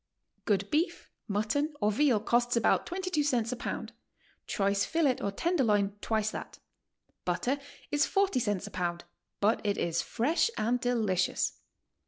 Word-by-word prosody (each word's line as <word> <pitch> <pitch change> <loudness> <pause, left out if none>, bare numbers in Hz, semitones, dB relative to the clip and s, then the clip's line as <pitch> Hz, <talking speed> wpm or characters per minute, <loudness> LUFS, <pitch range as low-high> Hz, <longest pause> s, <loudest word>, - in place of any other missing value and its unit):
Good 200 -2 +1
beef, 320 +5 0 0.2
mutton 225 +9 0
or 210 - +2
veal 250 0 +3
costs 240 +3 +2
about 230 - +2
22 365 -3 -1
cents 245 -6 +1
a - - -1
pound; - - -5 0.5
choice 200 -1 +1
filet 305 -6 +2
or 200 - 0
tenderloin 210 - +1
twice 220 -1 0
that. - - -7 0.7
Butter 185 +11 0 0.3
is 295 +1 +3
40 390 -9 +2
cents 205 -4 -1
a 205 - -8
pound, 175 -2 -2 0.4
but 210 +3 +2
iit 205 -1 0
is 170 -1 0
fresh 295 - +1
and 240 +3 +1
delicious. 220 -7 0
230 Hz, 145 wpm, -30 LUFS, 205-290 Hz, 0.7 s, veal